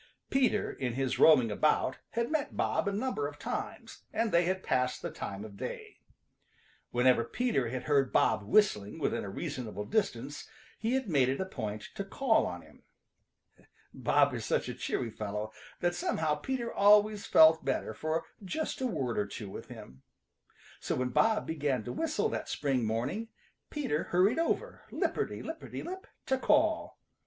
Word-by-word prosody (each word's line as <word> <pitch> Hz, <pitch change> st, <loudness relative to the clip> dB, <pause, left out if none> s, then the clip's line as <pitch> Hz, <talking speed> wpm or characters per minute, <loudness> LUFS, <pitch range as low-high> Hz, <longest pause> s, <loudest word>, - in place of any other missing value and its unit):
Peter, 255 Hz, -6 st, +2 dB
in 125 Hz, -3 st, -3 dB
his 130 Hz, +1 st, -1 dB
roaming 130 Hz, -8 st, +6 dB
about, 150 Hz, +9 st, +1 dB
had 235 Hz, +3 st, -1 dB
met 310 Hz, -3 st, -1 dB
Bob 210 Hz, -, +1 dB
a -, -, +2 dB
number 260 Hz, -, -1 dB
of -, -, -9 dB
times, -, -, -5 dB
and 225 Hz, -1 st, 0 dB
they 170 Hz, 0 st, +4 dB
had 185 Hz, +1 st, -1 dB
passed 125 Hz, 0 st, 0 dB
the -, -, -3 dB
time 100 Hz, +2 st, -6 dB
of 100 Hz, -2 st, -11 dB
day. -, -, -7 dB, 0.9 s
Whenever 125 Hz, -1 st, +4 dB
Peter 135 Hz, -, 0 dB
had 130 Hz, +1 st, -4 dB
heard 140 Hz, -3 st, +2 dB
Bob -, -, +3 dB
whistling 105 Hz, -, +2 dB
within -, -, -1 dB
a 100 Hz, -, -5 dB
reasonable 120 Hz, -, -5 dB
distance 145 Hz, -, -2 dB, 0.3 s
he 230 Hz, +4 st, 0 dB
had 265 Hz, -3 st, -1 dB
made 140 Hz, -7 st, +3 dB
it 135 Hz, -, -1 dB
a 190 Hz, -, 0 dB
point 105 Hz, -, -5 dB
to 200 Hz, -, -4 dB
call 225 Hz, +4 st, +2 dB
on 90 Hz, -1 st, -6 dB
him. -, -, -19 dB, 1.1 s
Bob -, -, +3 dB
is -, -, -4 dB
such -, -, 0 dB
a -, -, -3 dB
cheery 115 Hz, -3 st, -2 dB
fellow 105 Hz, 0 st, -4 dB, 0.3 s
that 175 Hz, 0 st, +2 dB
somehow 160 Hz, -3 st, 0 dB
Peter 235 Hz, -, -3 dB
always 210 Hz, 0 st, +5 dB
felt 160 Hz, 0 st, +7 dB
better 135 Hz, -4 st, -1 dB
for 155 Hz, +8 st, -2 dB, 0.2 s
just 310 Hz, -, -3 dB
a 260 Hz, -, +1 dB
word 130 Hz, -, -1 dB
or 100 Hz, -, 0 dB
two 100 Hz, -1 st, -7 dB
with -, -, -8 dB
him. 65 Hz, +1 st, -11 dB, 0.8 s
So -, -, -2 dB
when 130 Hz, 0 st, -1 dB
Bob 220 Hz, -, +2 dB
began 145 Hz, -7 st, -1 dB
to -, -, -5 dB
whistle 315 Hz, -1 st, 0 dB
that -, -, -4 dB
spring 135 Hz, -5 st, 0 dB
morning 120 Hz, -, -2 dB, 0.4 s
Peter 265 Hz, -, -1 dB
hurried 185 Hz, -, +3 dB
over, 330 Hz, -, -1 dB
lipperty -, -, -2 dB
lipperty -, -, -6 dB
lip, 375 Hz, +2 st, -7 dB, 0.2 s
to 265 Hz, 0 st, +1 dB
call. 315 Hz, +3 st, +2 dB
155 Hz, 170 wpm, -31 LUFS, -, 1.1 s, felt